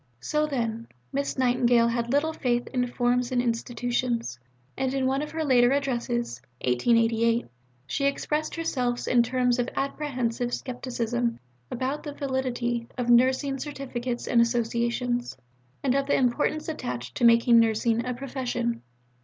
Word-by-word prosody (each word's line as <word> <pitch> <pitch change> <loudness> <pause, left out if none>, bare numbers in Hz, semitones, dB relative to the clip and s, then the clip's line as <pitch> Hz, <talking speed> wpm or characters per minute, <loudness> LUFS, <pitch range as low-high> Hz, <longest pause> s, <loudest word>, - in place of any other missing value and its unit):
So, 300 - 0
then, 230 -5 -2 0.3
Miss 280 0 -2
Nightingale 245 -2 +3
had 235 0 -1
little 300 +3 +2
faith 240 -4 0
in 250 -1 0
forms 245 0 0
and 250 - +1
institutions, 240 - -1 0.4
and 265 -1 -1
in 265 -1 +1
one 265 +2 +1
of 300 - -4
her 320 0 -3
later 245 -3 +5
Addresses 240 - -1 0.2
(1888) 230 - +2 0.4
she 275 - -1
expressed 300 +2 -1
herself 250 -7 -1
in 245 - +5
terms 250 0 +1
of 245 - 0
apprehensive 255 -4 -1
scepticism 240 -2 -2 0.3
about 260 +4 -2
the 295 -2 -6
validity 250 -4 -2
of 240 -1 +1
nursing 260 +3 +3
Certificates 255 -4 -4
and 235 - +4
Associations, 235 - 0 0.5
and 265 -3 +2
of 275 0 0
the - - +3
importance 275 +4 +1
attached 125 - -4
to - - -2
making 235 0 +6
nursing 225 +1 +2
a 250 0 -3
"Profession." 245 -3 -3
245 Hz, 140 wpm, -26 LUFS, 235-265 Hz, 0.5 s, making